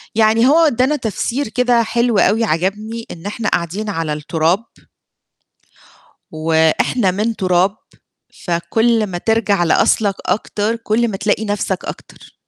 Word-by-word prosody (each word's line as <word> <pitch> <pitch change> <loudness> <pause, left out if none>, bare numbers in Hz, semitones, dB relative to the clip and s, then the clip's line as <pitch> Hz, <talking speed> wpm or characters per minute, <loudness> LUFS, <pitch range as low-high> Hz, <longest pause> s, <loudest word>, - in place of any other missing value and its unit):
يعني 225 +2 +4
هو 305 +4 +5
ادّانا 290 -3 +2
تفسير 240 +2 -2
كده 245 0 +2
حلو 235 0 0
أوي 220 +3 +3
عجبني، 215 +5 -2
إن 165 - -11
إحنا 210 +2 -2
قاعدين 190 +6 -2
على 165 -5 -2
التراب 160 +7 0 1.7
وإحنا 160 +6 +1
من 215 +5 -1
تراب، 185 +1 +1 0.7
فكلّ 220 +7 +1
ما 180 -2 -5
ترجع 205 -2 +1
لأصلك 195 +4 +2
أكتر 210 +3 -1
كلّ 230 +1 0
ما 205 -4 -4
تلاقي 210 +2 0
نفْسك 205 -2 -2
أكتر. - - -10
210 Hz, 125 wpm, -17 LUFS, 180-230 Hz, 1.7 s, هو